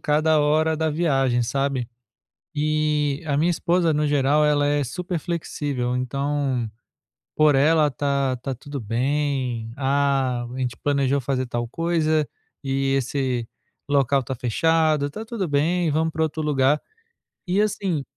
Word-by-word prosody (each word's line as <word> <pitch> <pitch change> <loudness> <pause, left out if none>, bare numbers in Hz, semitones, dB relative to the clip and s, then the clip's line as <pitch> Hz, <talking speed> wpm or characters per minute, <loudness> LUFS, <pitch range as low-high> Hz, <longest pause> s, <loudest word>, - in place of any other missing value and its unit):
cada 155 +1 +2
hora 155 +2 +2
da 160 0 0
viagem, 135 -6 +1
sabe. 135 0 -1 0.7
E 150 0 0
a 145 -2 0
minha 165 +4 +2
esposa, 170 -1 +1
no 150 +1 +1
geral, 145 +1 +3
ela 145 -1 +2
é 145 0 +1
super 180 - -4
flexível, 145 -7 -3
então 135 -1 -1 0.7
por 155 -2 +5
ela, 150 +2 +4
tá 140 0 0
tá 135 +2 -4
tudo 145 +3 -7
bem. 125 0 -1
"Ah, 135 -3 +1
a - - -7
gente 125 -3 -2
planejou 140 -1 +1
fazer 130 0 -1
tal 120 -1 -3
coisa 155 0 0 0.4
e 135 0 0
esse 130 -3 -1 0.4
local 140 -1 +2
tá 130 - -4
fechado, 155 +4 +1
tá 215 +9 -7
tudo 220 -6 -3
bem, 160 +3 +1
vamo 160 +2 +1
pra 160 - 0
outro 155 0 -2
lugar". 145 -1 +2 0.7
E 185 +3 +1
assim, 195 -7 0
145 Hz, 140 wpm, -23 LUFS, 135-155 Hz, 0.7 s, por